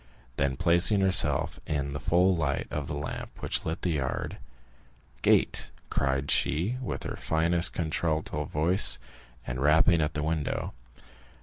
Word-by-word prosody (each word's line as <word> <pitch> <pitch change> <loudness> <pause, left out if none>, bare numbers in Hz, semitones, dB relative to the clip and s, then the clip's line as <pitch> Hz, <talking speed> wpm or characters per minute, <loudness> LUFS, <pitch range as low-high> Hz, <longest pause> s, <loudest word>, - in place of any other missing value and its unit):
Then 70 -1 0
placing 90 +5 +4
herself 95 -1 +2
in 70 -2 -2
the 70 - -4
full 90 +4 +2
light 75 -5 -1
of 75 -3 -4
the 75 - -4
lamp 70 -1 -6
which - - -2
lit 80 +1 -4
the 90 - +1
yard: 70 -5 -3 0.8
"Gate!" - - +2 0.2
cried 70 0 0
she, 90 +11 +2
with 130 - -4
her - - -5
finest 85 +2 +1
contralto 80 -2 -2
voice, 85 +7 +3 0.5
and 60 +1 -4
rapping 80 +3 +4
at 75 0 -2
the 75 - -2
window. 80 -2 -2
80 Hz, 140 wpm, -28 LUFS, 70-85 Hz, 0.8 s, placing